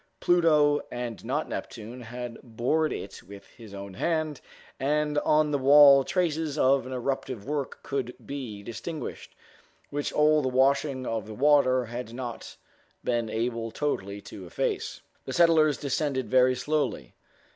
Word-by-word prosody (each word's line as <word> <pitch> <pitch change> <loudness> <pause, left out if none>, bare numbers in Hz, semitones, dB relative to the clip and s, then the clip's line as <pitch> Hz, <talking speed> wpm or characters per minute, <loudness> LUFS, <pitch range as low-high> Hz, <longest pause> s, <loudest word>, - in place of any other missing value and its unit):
Pluto 155 -4 +4
and 120 -3 -5
not 140 +7 -2
Neptune 115 +3 -7
had 120 0 -7
bored 130 +7 0
it 95 - -6
with 100 +2 -13
his 115 -4 -14
own 100 -1 -8
hand, 155 - -1 0.4
and 150 +2 +1
on 150 0 +2
the 145 - +1
wall 140 0 +8
traces 160 -3 -1
of 135 -2 +3
an - - -7
eruptive 130 -3 -3
work 145 -1 -4
could 130 -3 -3
be 120 -8 -6
distinguished, 145 +9 -7 0.6
which 145 0 -2
all 150 0 +4
the 130 - 0
washing 135 +1 +2
of 110 -3 -3
the 110 - -8
water 130 -2 +4
had 120 0 -7
not 120 -2 -7 0.5
been 120 -2 0
able 115 0 -2
totally 100 -7 -3
to 95 -2 -10
efface. - - -3 0.2
The - - -5
settlers 160 -3 +4
descended 140 -1 -1
very 130 0 +5
slowly. 145 0 -2
130 Hz, 145 wpm, -27 LUFS, 120-150 Hz, 0.6 s, wall